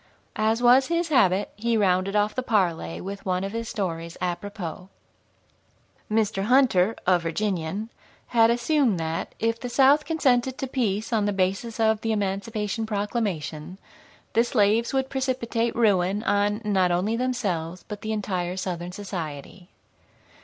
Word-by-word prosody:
As 220 +2 +1
was 255 +2 +6
his 335 0 0
habit, 205 - +3
he 230 +2 0
rounded 190 0 +1
off 210 0 +2
the 255 - -2
parley 180 - 0
with 195 +1 -7
one 185 0 -1
of 195 - -3
his 230 +1 -4
stories 170 -5 -4
apropos. 180 0 -5 1.2
Mr. 210 -2 +1
Hunter, 225 -5 +4
a 180 -1 +4
Virginian, 190 +4 -2 0.4
had 230 -2 +5
assumed 240 - +2
that, 160 0 -3
if 230 +1 0
the 245 - -5
South 275 +4 +5
consented 260 -5 +1
to - - -3
peace 225 -4 -1
on 215 -2 +2
the 205 - +1
basis 195 +4 -1
of 220 -1 +2
the 225 - -1
Emancipation 210 +2 -2
Proclamation, 200 -6 -3 0.6
the 230 - +4
slaves 225 -1 +2
would 265 -1 0
precipitate 250 -3 -1
ruin 200 -2 +2
on 205 +1 +1
not 190 -3 +2
only 185 +6 0
themselves, 195 -9 -2
but 210 -1 -7
the 220 - -3
entire 185 -4 -2
Southern 180 -2 -4
society. 180 -2 -7
210 Hz, 145 wpm, -25 LUFS, 185-235 Hz, 1.2 s, was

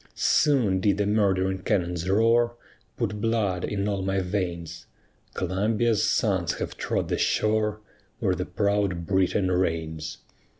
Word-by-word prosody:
Soon 125 -11 +3
did 100 +1 +2
the 105 - +1
murdering 95 -2 +1
cannon's 90 -1 -1
roar 115 +3 +3 0.4
Put 105 -3 -2
blood 105 -5 0
in 100 -1 -2
all 100 -2 -1
my 95 +1 0
veins; 90 -3 -4 0.5
Columbia's 105 +4 +1
sons 95 -5 +1
have - - -5
trod - - -2
the - - -1
shore 110 0 +1 0.4
Where - - +1
the - - -3
proud 100 -4 0
Britain 95 0 +1
reigns. 80 -3 -2
100 Hz, 130 wpm, -26 LUFS, 90-105 Hz, 0.5 s, Soon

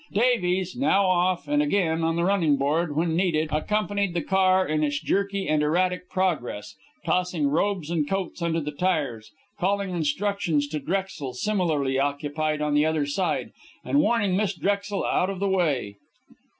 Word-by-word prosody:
Davies, 190 -5 +1
now 245 -7 +2
off, 180 0 +1
and 295 0 +2
again 180 - +1
on 165 0 +1
the 170 - 0
running 175 -6 +2
board 150 +3 0
when 160 +1 +1
needed, 165 -3 +1
accompanied 200 +3 -1
the 170 - 0
car 190 0 +3
in 155 0 0
its 145 -1 0
jerky 200 +4 -1
and 155 0 +2
erratic 180 +4 0
progress, 150 - -2 0.3
tossing 180 -4 0
robes 170 +2 0
and 155 -4 0
coats 195 -2 -3
under 165 -1 0
the 150 -1 -4
tires, 145 -9 -2 0.3
calling 200 +1 0
instructions 170 -1 0
to 155 0 -3
Drexel 175 -6 -3
similarly 150 -7 0
occupied 145 +2 -1
on 150 -1 0
the 145 0 +4
other 155 -2 +1
side, 145 +7 -1 0.3
and 285 - +2
warning 225 -9 +2
Miss 200 -1 0
Drexel 200 +2 -1
out 185 - +1
of 195 -2 -4
the 200 - 0
way. 150 - 0
175 Hz, 165 wpm, -25 LUFS, 150-195 Hz, 0.3 s, the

